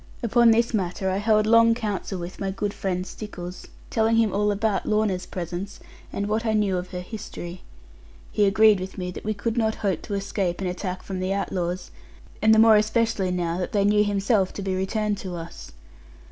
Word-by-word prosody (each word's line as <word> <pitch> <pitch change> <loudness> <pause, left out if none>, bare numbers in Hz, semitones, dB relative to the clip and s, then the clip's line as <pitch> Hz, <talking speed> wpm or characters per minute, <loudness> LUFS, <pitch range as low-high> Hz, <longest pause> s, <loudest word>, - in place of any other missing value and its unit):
Upon 235 +1 +5
this 230 +1 +3
matter 190 -1 -1
I 190 - 0
held 215 +1 +3
long 230 +1 +5
council 205 -4 -3
with 175 +1 -7
my 195 - -2
good 200 +1 -2
friend 185 -1 -2
Stickles; 180 -3 -8 0.2
telling 225 0 +2
him 225 -3 +3
all 210 +1 +2
about 205 0 0
Lorna's 210 -4 0
presence, 180 +3 -5 0.3
and 200 - -2
what 215 +2 0
I 220 -2 0
knew 205 -3 +2
of 180 0 -4
her 180 -1 -5
history. 180 -3 -8 0.7
He 210 - +3
agreed 215 0 +5
with 185 +1 -7
me 180 -1 -3
that - - -8
we 215 0 -2
could 225 +3 -2
not 220 -1 +1
hope 190 -5 0
to 205 - -4
escape 195 -3 -2
an 190 - -3
attack 180 +1 -4
from 190 -1 -5
the 185 +1 -1
outlaws, 180 -2 -3 0.5
and 220 - +5
the 220 - +6
more 220 -1 +7
especially 220 -2 +1
now 175 -1 -1
that 180 - -3
they 200 -1 +3
knew 210 +1 +4
himself 200 -1 +1
to 200 - -5
be 190 -1 -1
returned 205 +2 -1
to 185 -2 -5
us. 165 0 -9
200 Hz, 200 wpm, -25 LUFS, 185-215 Hz, 0.7 s, more